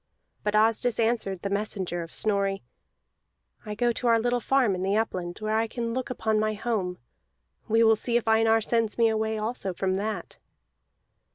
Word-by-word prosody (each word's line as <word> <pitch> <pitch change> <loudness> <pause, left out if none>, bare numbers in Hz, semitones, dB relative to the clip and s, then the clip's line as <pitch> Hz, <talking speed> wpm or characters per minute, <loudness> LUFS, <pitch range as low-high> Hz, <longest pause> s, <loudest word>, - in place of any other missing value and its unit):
But 210 0 -1
Asdis 225 +2 +2
answered 220 -5 0
the 200 - -1
messenger 200 -4 -2
of 165 -1 -8
Snorri: 200 -2 0 1.0
"I 210 - -4
go 240 +2 +2
to 240 +1 -2
our 230 -1 +5
little 245 +1 +1
farm 255 -4 +2
in 180 - -3
the 195 +2 +1
upland, 180 -6 -2
where 215 0 -2
I 225 +1 +1
can 230 0 -4
look 255 0 -3
upon 220 -3 0
my 215 0 0
home. 205 -5 -2 0.7
We 225 +1 +4
will 225 0 +6
see 235 +2 0
if 235 - -3
Einar 225 0 +4
sends 225 -1 0
me 230 -1 +4
away 220 0 -1
also 215 -3 -3
from 190 +1 0
that." 215 +2 -4
220 Hz, 180 wpm, -26 LUFS, 200-230 Hz, 1.0 s, will